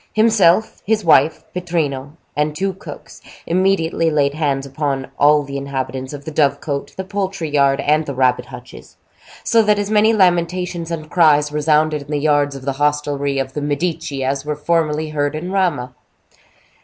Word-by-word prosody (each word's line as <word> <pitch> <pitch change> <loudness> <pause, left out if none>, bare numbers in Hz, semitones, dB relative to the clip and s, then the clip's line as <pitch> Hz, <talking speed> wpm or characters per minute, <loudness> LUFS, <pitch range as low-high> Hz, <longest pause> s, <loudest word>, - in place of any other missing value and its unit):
Himself, 215 -3 +3
his 215 -2 0
wife, 160 0 +4
Pittrino, 150 -6 -2 0.2
and 150 0 0
two 195 +3 -1
cooks, 190 - -11 0.2
immediately 170 -2 +1
laid 145 -2 +1
hands 140 -3 -1
upon 135 -1 -3
all 150 +1 +5
the 140 0 -6
inhabitants 130 -1 -4
of 145 -1 -9
the 160 - -5
dove 140 -2 +2
cote, 140 -2 -5
the 190 - -3
poultry 190 -4 -3
yard, 140 -1 +3
and 155 +1 +1
the 140 - -4
rabbit 130 -1 +1
hutches; - - -12 0.5
so 230 - +4
that 210 -1 +2
as 205 0 -2
many 215 +1 +4
lamentations 180 -3 +1
and 155 -2 -6
cries 150 -4 +4
resounded 150 0 +1
in 140 - -13
the 150 - -1
yards 145 -1 +1
of 135 -1 -9
the 135 -1 -2
hostelry 145 -1 0
of 135 -1 -3
the 150 - -4
Medici 145 -1 -2
as 135 +1 -1
were 150 0 -3
formerly 155 0 0
heard 145 0 -1
in 175 +4 -5
Rama. 165 -10 0
150 Hz, 170 wpm, -19 LUFS, 140-175 Hz, 0.5 s, all